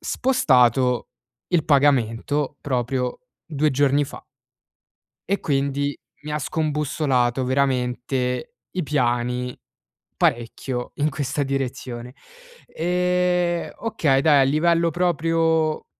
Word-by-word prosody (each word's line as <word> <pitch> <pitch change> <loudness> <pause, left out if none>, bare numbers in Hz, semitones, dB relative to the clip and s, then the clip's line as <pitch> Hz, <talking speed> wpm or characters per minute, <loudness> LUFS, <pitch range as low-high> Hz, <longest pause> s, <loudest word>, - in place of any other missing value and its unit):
spostato 130 - +2 0.4
il 165 -4 +3
pagamento 140 0 +2
proprio 125 -1 -2 0.3
2 155 -1 +1
giorni 140 +1 +2
fa. - - -11 1.1
E 200 - +1
quindi 140 0 -1 0.3
mi 150 - -5
ha 150 - -1
scombussolato 145 -4 0
veramente 125 -1 -1 0.2
i 180 -2 -2
piani, 125 -3 -1 0.6
parecchio 125 +1 -1
in 150 +1 +1
questa 145 0 -2
direzione. 130 -3 -4 0.5
E, 180 0 0
okay, 155 -12 +1
dai 145 -2 +5
a - - +6
livello 165 +4 +2
proprio 165 -2 +1
140 Hz, 95 wpm, -23 LUFS, 125-160 Hz, 1.1 s, a